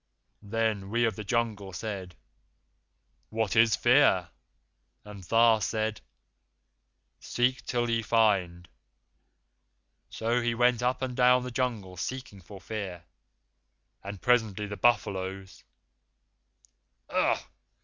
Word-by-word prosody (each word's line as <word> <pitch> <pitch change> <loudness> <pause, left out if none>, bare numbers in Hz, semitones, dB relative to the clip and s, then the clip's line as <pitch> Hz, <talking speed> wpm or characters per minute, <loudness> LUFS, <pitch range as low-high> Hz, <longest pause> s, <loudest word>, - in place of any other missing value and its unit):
Then 105 -2 -2
we 120 +2 +2
of 115 - -1
the 110 - -6
jungle 105 -3 -2
said, 95 -4 -6 1.1
'What 110 -1 -1
is 115 -1 +5
Fear?' 120 -9 +4 0.8
And 105 -2 -10
Tha 115 +4 +4
said, 110 +2 -2 1.2
'Seek 125 +1 0
till 120 -1 0
ye 115 -1 +1
find.' 100 -7 +1 1.4
So 115 +2 -1
we 120 0 0
went 120 0 +3
up 125 +2 0
and 125 -1 -3
down 125 0 +4
the 125 - -6
Jungle 115 -7 -3
seeking 125 -1 -6
for 100 +2 -12
Fear, 95 -3 -6 1.0
and 100 0 -7
presently 110 -4 +2
the 105 0 -6
buffaloes 95 -4 -1 0.7
" - - -39
"Ugh!" - - +2
110 Hz, 110 wpm, -28 LUFS, 100-120 Hz, 1.4 s, is